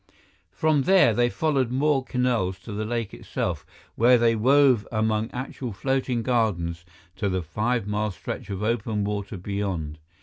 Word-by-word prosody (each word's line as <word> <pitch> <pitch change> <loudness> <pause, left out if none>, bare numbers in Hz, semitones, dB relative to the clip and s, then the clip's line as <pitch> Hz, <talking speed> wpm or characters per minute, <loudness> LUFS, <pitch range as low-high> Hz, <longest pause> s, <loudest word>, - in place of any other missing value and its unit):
From 155 -2 +1
there, 185 - +5
they 120 +2 +2
followed 140 -4 0
more 135 +1 +1
canals 125 -8 0
to 115 - -9
the 105 +1 -3
lake 115 -1 -3
itself, - - -4 0.3
where 125 +2 +5
they 115 -1 +3
wove 130 0 +4
among 110 0 0
actual 125 -1 -5
floating 130 +1 -1
gardens 90 -9 0 0.3
to 100 0 0
the 95 -1 -1
five 110 +7 -1
mile 105 +1 -1
stretch 95 +1 -7
of 100 +1 -4
open 110 -2 -1
water 100 -1 -3
beyond. 90 -5 -3
110 Hz, 155 wpm, -25 LUFS, 100-125 Hz, 0.3 s, there